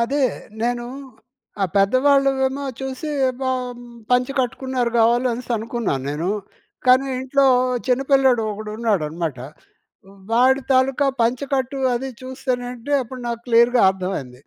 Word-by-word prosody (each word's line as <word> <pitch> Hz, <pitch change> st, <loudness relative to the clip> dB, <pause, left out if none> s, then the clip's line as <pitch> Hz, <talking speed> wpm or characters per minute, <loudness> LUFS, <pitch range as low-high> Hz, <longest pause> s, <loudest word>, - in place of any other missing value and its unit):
అదే. 275 Hz, +4 st, +1 dB, 0.4 s
నేను 240 Hz, 0 st, -1 dB, 0.8 s
ఆ -, -, +4 dB
పెద్దవాళ్ళవేమో 270 Hz, +5 st, +3 dB, 0.2 s
చూసి 265 Hz, +3 st, -5 dB, 0.3 s
ప -, -, -5 dB, 0.7 s
పంచె 250 Hz, +2 st, +2 dB
కట్టుకున్నారు 250 Hz, -1 st, -2 dB
కావాలి 240 Hz, +3 st, +3 dB
అనేసి 245 Hz, +1 st, -7 dB
అనుకున్నాను 220 Hz, -, -3 dB
నేను. 160 Hz, +5 st, -2 dB, 0.6 s
కానీ 255 Hz, +2 st, +5 dB
ఇంట్లో 270 Hz, +1 st, +2 dB, 0.4 s
చిన్నపిల్లోడు 265 Hz, -2 st, +3 dB
ఒకడున్నాడనమాట. 200 Hz, -, -2 dB, 0.9 s
వాడి 260 Hz, +3 st, +4 dB
తాలూకా 265 Hz, +2 st, +2 dB, 0.2 s
పంచెకట్టు 265 Hz, +2 st, -1 dB, 0.2 s
అది 265 Hz, +3 st, -3 dB
చూస్తేనంటే 255 Hz, 0 st, -4 dB
అప్పుడు 255 Hz, +1 st, -9 dB
నాకు 235 Hz, -1 st, -3 dB
క్లియర్‌గా 235 Hz, +1 st, +4 dB
అర్థమయింది. 180 Hz, -10 st, -5 dB
250 Hz, 105 wpm, -21 LUFS, 230-265 Hz, 0.9 s, కానీ